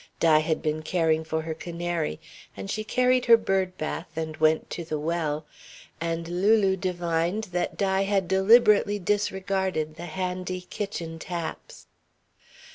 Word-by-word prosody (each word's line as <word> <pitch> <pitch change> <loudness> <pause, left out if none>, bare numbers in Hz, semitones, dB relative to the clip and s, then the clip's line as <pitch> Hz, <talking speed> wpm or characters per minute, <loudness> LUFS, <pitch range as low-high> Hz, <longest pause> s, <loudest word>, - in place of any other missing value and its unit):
Di 160 -2 +5
had 155 0 -1
been 155 0 -1
caring 160 -1 +1
for 160 0 -2
her 160 0 -3
canary 170 -1 -3 0.4
and 195 - -5
she 215 - -2
carried 250 +3 +2
her 230 -1 +8
bird 190 -4 -1
bath 160 +2 -4
and 160 -1 -3
went 155 0 +2
to 170 - -4
the 155 -1 -3
well, 155 -1 -2 0.6
and 165 0 -2
Lulu 195 +2 +3
divined 175 +1 -1
that 180 0 -2
Di 195 -1 +1
had 195 -2 +1
deliberately 205 +1 +5
disregarded 190 -5 -1
the 175 +1 -7
handy 185 +1 -3
kitchen 170 -3 -5
taps. 170 -1 -6
175 Hz, 140 wpm, -26 LUFS, 160-195 Hz, 0.6 s, her